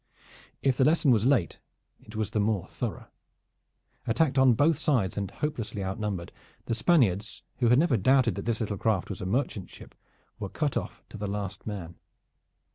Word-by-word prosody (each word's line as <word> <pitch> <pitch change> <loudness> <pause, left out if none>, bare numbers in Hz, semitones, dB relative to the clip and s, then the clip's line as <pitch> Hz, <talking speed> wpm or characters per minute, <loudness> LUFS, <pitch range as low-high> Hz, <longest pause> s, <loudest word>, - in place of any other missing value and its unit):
If 135 -2 +2
the - - +4
lesson 155 -1 +4
was 115 0 +3
late, 125 - +1 0.4
it 110 - -14
was 110 -1 -2
the 110 - 0
more 105 -3 +1
thorough. - - -5 1.0
Attacked 135 +3 +2
on 130 -2 +6
both 145 +4 +3
sides 125 -12 +1
and 100 -2 -2
hopelessly 115 -9 -4
outnumbered, 95 -2 -3 0.3
the - - -1
Spaniards, 115 - +2
who 120 - +2
had 125 +2 +5
never 145 -5 +3
doubted 130 +3 +3
that - - -6
this 115 0 -1
little 105 -3 -2
craft 110 -4 0
was 100 - -6
a 90 - -3
merchant 100 -4 -1
ship, - - -13 0.5
were - - -4
cut - - -1
off - - -4
to - - -9
the 105 - -3
last 100 -1 -5
man. 90 -5 -6
110 Hz, 180 wpm, -28 LUFS, 100-130 Hz, 1.0 s, on